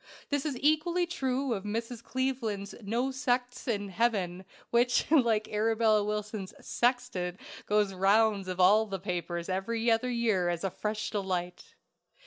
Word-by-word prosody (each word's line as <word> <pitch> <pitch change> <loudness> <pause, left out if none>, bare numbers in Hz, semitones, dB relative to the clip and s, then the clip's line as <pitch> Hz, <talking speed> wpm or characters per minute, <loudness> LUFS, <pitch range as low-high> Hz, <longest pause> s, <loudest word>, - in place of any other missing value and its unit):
This 285 +1 0
is 275 -4 -3
equally 315 +4 +2
true 270 -6 -1
of 195 -3 -4
Mrs. 230 +2 -4
Cleaveland's 235 -7 -2
"No 235 +6 -1
Sects 250 -1 -1
in 205 -4 -1
Heaven," 190 -3 0 0.3
which, 245 +1 +3
like 230 -8 +3
Arabella 220 0 +2
Wilson's 210 -1 -4
"Sextant," 240 -7 -1 0.3
goes 210 -1 +3
the 190 - -10
rounds 200 0 +3
of 185 0 -4
all 210 +4 +5
the 195 -1 -3
papers 175 -2 -3
every 225 +5 0
other 225 +3 +2
year 225 -7 +1
as 175 0 -2
a 195 - -1
fresh 215 +2 -3
delight. 180 -3 -3
215 Hz, 145 wpm, -30 LUFS, 195-245 Hz, 0.3 s, all